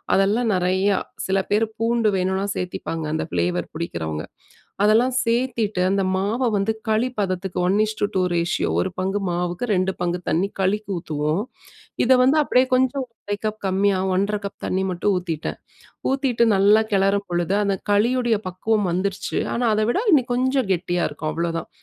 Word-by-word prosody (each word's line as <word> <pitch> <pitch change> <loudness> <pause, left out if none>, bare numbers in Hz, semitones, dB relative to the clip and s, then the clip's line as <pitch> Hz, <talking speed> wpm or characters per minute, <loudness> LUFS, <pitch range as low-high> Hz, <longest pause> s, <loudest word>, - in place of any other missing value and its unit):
அதெல்லாம் 210 +5 +2
நெறைய 185 +2 +1 0.4
சில 195 0 +2
பேரு 210 +2 +3
பூண்டு 230 -1 +1
வேணுன்னா 190 +1 0
சேத்திப்பாங்க. 165 -3 -4
அந்த 160 - -1
ப்ளேவர் 175 0 0
பிடிக்கிறவங்க. 80 - -4 0.6
அதெல்லாம் 235 +5 +4
சேத்திட்டு 230 -5 0
இந்த 195 - +1
மாவ 210 +7 -1
வந்து 200 +2 +1 0.2
களி 220 +3 +2
பதத்துக்கு 185 -1 -2
1:2 210 0 +1
ரேஷியோ 170 +1 0
1 190 - -1
பங்கு 195 +2 -1
மாவுக்கு, 175 +4 -2
2 185 +1 +1
பங்கு 175 0 -1
தண்ணீ, 185 +5 +1
களிக்கு 205 +2 0
ஊத்துவோம். 155 +3 -1 0.6
இத 250 - +4
வந்து 265 +4 +4
அப்டியே 255 -2 +3
கொஞ்சம் 260 +1 +1 0.2
1/2 205 - -1
கப் 215 0 -2
கம்மியா 195 +1 +2 0.2
1-1/2 200 +3 +1
கப் 200 - -7
தண்ணீ 190 +1 0
மட்டும் 185 +3 0
ஊத்திட்டேன். 165 -4 -4 0.5
ஊத்திட்டு 265 -4 +2
நல்லா 205 +3 +5
கெளறும் 195 +1 +2
பொழுது, 175 +2 0
அந்த 200 -1 +1 0.2
களியுடைய 235 +1 +2
பக்குவம் 200 +2 0
வந்துருச்சு, 190 +2 -2 0.2
ஆனா 245 - -1
அதவிட 215 - +1
இன்னும் 250 -5 +3
கொஞ்சம் 260 -2 +1
கெட்டியா 175 -1 0
இருக்கும் 155 +1 -4
அவ்ளோதான். 165 0 -3
200 Hz, 150 wpm, -22 LUFS, 180-225 Hz, 0.6 s, நல்லா